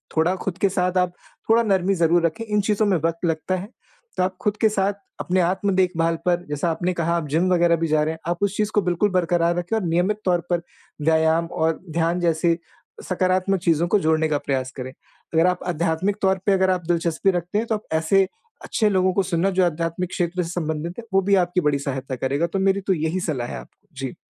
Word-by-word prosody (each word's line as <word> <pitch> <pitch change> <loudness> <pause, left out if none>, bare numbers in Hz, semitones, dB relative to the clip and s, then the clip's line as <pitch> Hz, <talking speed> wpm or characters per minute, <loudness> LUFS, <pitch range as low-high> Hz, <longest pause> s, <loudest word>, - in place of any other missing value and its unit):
थोड़ा 165 +4 +2
ख़ुद 185 -2 -3
के 200 - +2
साथ 185 -1 0
आप 180 -1 +1 0.4
थोड़ा 230 +1 +5
नरमी 195 -2 +2
ज़रूर 170 0 +3
रखें 195 +8 -2
इन 210 -1 +1
चीज़ों 210 +1 +1
में 190 -4 +2
वक़्त 165 +2 -2
लगता 165 +3 -1
है। 190 +4 -6 0.5
तो - - +2
आप 185 0 -2
ख़ुद 210 0 0
के 220 - +5
साथ 200 -1 0 0.3
अपने 185 0 0
आत्म-देखभाल 180 -2 +1
पर 175 0 +1
जैसा 150 +3 -1
आपने 180 +2 -1
कहा 170 0 0
आप 160 -3 -3
जिम-वगैरह 170 +2 +3
भी 165 0 -1
जा 155 0 +2
रहे 155 +1 -1
हैं। 160 - -11
आप 175 - -1
उस 200 0 0
चीज़ 210 0 0
को 210 - +4
बिल्कुल 180 +3 +1
बरकरार 175 -1 +1
रखें 175 +5 -1
और 215 - -2
नियमित 180 +6 +1
तौर 175 -2 +2
पर 175 -1 +1 0.4
व्यायाम 160 +2 +3
और 160 -1 -1
ध्यान 165 +2 0
जैसे 170 0 +2 0.5
सकारात्मक 185 +1 +1
चीज़ों 170 -1 +2
को 205 - +3
जोड़ने 160 -1 +2
का 150 -2 0
प्रयास 130 -2 -1
करें। 130 0 -5 0.4
अगर 165 +2 +4
आप 180 0 +1
आध्यात्मिक 170 +3 0
तौर 190 0 +3
पे 200 - +3
अगर 190 -1 +2
आप 180 -2 -2
दिलचस्पी 170 +2 +1
रखते 180 +3 -2
हैं 230 - -1
तो 225 - +1
आप 210 - -6
ऐसे 185 +5 +3 0.4
अच्छे 215 -2 +1
लोगों 185 -1 +2
को 195 +1 +2
सुनना 180 +1 0
जो 185 - +5
आध्यात्मिक 170 +2 -2
क्षेत्र 180 0 -1
से 165 - -6
संबंधित 165 -1 -3
है - - -7
वो 195 - +4
भी 200 +1 +3
आपकी 180 +1 -1
बड़ी 145 -2 +1
सहायता 135 -1 -4
करेगा 140 +6 -1
तो 195 - 0
मेरी 195 +1 +2
तो 190 - +4
यही 160 +3 -1
सलाह 140 -9 -2
है - - -6
आपको। - - -15
जी। 135 -2 -5
175 Hz, 225 wpm, -23 LUFS, 165-190 Hz, 0.5 s, थोड़ा